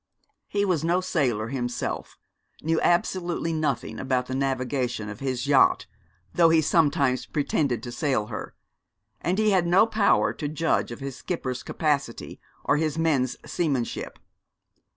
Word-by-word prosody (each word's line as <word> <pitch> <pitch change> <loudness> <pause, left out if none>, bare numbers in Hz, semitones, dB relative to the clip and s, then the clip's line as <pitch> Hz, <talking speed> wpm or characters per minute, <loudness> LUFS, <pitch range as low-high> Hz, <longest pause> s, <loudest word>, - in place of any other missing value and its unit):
He 205 0 0
was 180 -5 0
no 170 +2 +2
sailor 125 -12 0
himself, 125 -2 -3 0.5
knew 160 +1 +1
absolutely 175 -1 +1
nothing 150 -6 -2
about 130 -1 0
the 130 - -5
navigation 125 -4 -1
of 105 - -8
his 130 -1 -2
yacht, 135 -9 +4 0.5
though 170 -2 +5
he 160 0 +5
sometimes 145 -5 +2
pretended 140 -4 0
to 120 - -6
sail 130 -6 0
her; 110 - -7 0.7
and 180 +2 0
he 215 -1 +3
had 180 -3 +2
no 180 +5 +5
power 220 -2 +2
to 150 - -4
judge 155 +2 0
of 120 - -8
his 135 -2 -5
skipper's 130 -8 -4
capacity 140 -6 -2 0.2
or 145 - +2
his 155 0 -1
men's 145 -6 +1
seamanship. 140 -8 -2
145 Hz, 145 wpm, -26 LUFS, 130-165 Hz, 0.7 s, though